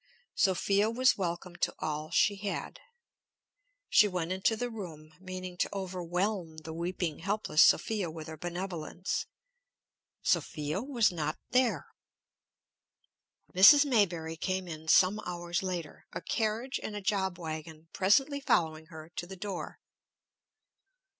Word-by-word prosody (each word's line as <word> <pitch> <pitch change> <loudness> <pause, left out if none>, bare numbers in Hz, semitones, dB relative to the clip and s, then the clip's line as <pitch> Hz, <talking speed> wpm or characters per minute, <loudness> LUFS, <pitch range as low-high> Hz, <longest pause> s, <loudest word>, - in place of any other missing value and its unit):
Sophia 200 +2 +2
was 255 +3 +3
welcome 175 -1 -4
to - - -1
all 155 0 -3
she 200 +4 +3
had. 200 0 -4 1.1
She 210 - +6
went 180 -3 -2
into 190 +4 +1
the 245 +2 -3
room, 160 -8 -8
meaning 185 -1 -7
to - - 0
overwhelm 180 -2 -2
the 160 0 -8
weeping, 170 -1 -3
helpless 200 -6 +1
Sophia 205 -6 +4
with 160 -1 -8
her 160 0 -7
benevolence. 175 +1 -4 1.0
Sophia 150 +5 0
was 240 -6 +2
not 155 -3 -2
there. 250 -1 +2 1.7
Mrs. 240 +11 +9
Maybury 175 - +1
came 185 +2 -2
in 160 -1 -8
some 185 +5 +5
hours 175 -1 -3
later, 180 -5 -5
a 170 - -4
carriage 225 +6 -1
and 210 - -5
a 205 - -4
job 190 -2 0
wagon 160 -1 -7
presently 270 +10 +3
following 160 - +1
her 160 -1 -11
to 175 - -3
the 190 +1 -9
door. 195 -1 -5
185 Hz, 125 wpm, -30 LUFS, 165-205 Hz, 1.7 s, Mrs